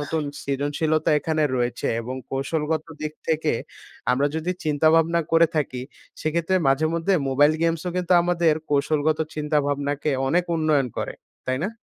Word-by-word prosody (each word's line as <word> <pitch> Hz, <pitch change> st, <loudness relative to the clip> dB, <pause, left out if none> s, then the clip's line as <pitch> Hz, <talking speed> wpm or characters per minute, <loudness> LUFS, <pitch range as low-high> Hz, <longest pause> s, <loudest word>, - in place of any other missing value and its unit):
নতুন 155 Hz, +2 st, -2 dB, 0.2 s
সৃজনশীলতা 145 Hz, +3 st, 0 dB
এখানে 155 Hz, +1 st, -1 dB
রয়েছে 120 Hz, -1 st, -1 dB
এবং 125 Hz, +3 st, -5 dB
কৌশলগত 150 Hz, +3 st, -1 dB, 0.2 s
দিক 155 Hz, 0 st, -3 dB, 0.2 s
থেকে 160 Hz, -1 st, +1 dB, 0.6 s
আমরা 140 Hz, +3 st, +2 dB
যদি 160 Hz, +3 st, -1 dB
চিন্তা 150 Hz, +1 st, +1 dB
ভাবনা 165 Hz, +1 st, +3 dB
করে 165 Hz, 0 st, +6 dB
থাকি 130 Hz, -4 st, -1 dB, 0.4 s
সেক্ষেত্রে 170 Hz, +4 st, 0 dB
মাঝেমধ্যে 165 Hz, +6 st, +2 dB
মোবাইল 145 Hz, +3 st, +4 dB
গেমস 165 Hz, -1 st, +1 dB
ও -, -, -2 dB
কিন্তু 180 Hz, 0 st, +1 dB
আমাদের 170 Hz, -3 st, +2 dB, 0.2 s
কৌশলগত 150 Hz, +2 st, +1 dB, 0.2 s
চিন্তাভাবনাকে 145 Hz, -1 st, 0 dB, 0.2 s
অনেক 175 Hz, +4 st, +2 dB
উন্নয়ন 155 Hz, -4 st, +2 dB
করে। -, -, -3 dB, 0.3 s
তাই 130 Hz, 0 st, 0 dB
না? -, -, 0 dB
155 Hz, 140 wpm, -24 LUFS, 145-165 Hz, 0.6 s, করে